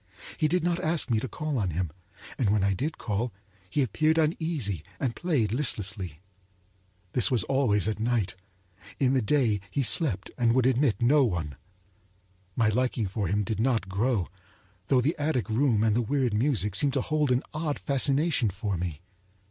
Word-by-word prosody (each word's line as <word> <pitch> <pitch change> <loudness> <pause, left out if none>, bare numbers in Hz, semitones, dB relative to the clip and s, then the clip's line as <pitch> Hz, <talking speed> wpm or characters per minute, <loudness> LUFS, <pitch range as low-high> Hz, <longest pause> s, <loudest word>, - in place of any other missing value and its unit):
He 155 - +1
did 175 +2 0
not 175 0 +1
ask 160 -4 0
me 110 - +3
to 130 - -4
call 150 -1 -3
on 95 -4 0
him, 85 -1 -2 0.5
and 115 -6 +2
when 105 -1 +2
I 100 0 +2
did 145 - -3
call 115 +3 -2 0.4
he 145 - +1
appeared 155 +7 +1
uneasy 155 - 0 0.2
and 125 -5 -1
played 145 - 0
listlessly. 100 - -2 0.9
This 125 - +2
was 125 -5 +2
always 115 -8 +1
at 110 -1 -2
night—in 100 +1 -3
the 130 - +3
day 115 -3 +2
he 140 - -1
slept 125 - +1
and 115 -1 +3
would 130 -1 +3
admit 125 -4 +2
no 140 +4 +5
one. 85 - -2 1.0
My 115 -2 +3
liking 120 0 0
for 100 +1 -2
him 105 +4 +1
did 110 +1 -3
not 115 -5 +1
grow, 100 -1 0 0.6
though 130 0 +4
the 145 +6 0
attic 145 -6 0
room 115 -1 +2
and 110 -1 +2
the 120 - +2
weird 125 -1 0
music 105 - +1
seemed 140 +6 +2
to 135 - +1
hold 150 -2 0
an 125 +1 +2
odd 155 -1 -2
fascination 140 -2 +1
for 100 0 -3
me. 85 -3 -4
120 Hz, 175 wpm, -27 LUFS, 100-140 Hz, 1.0 s, no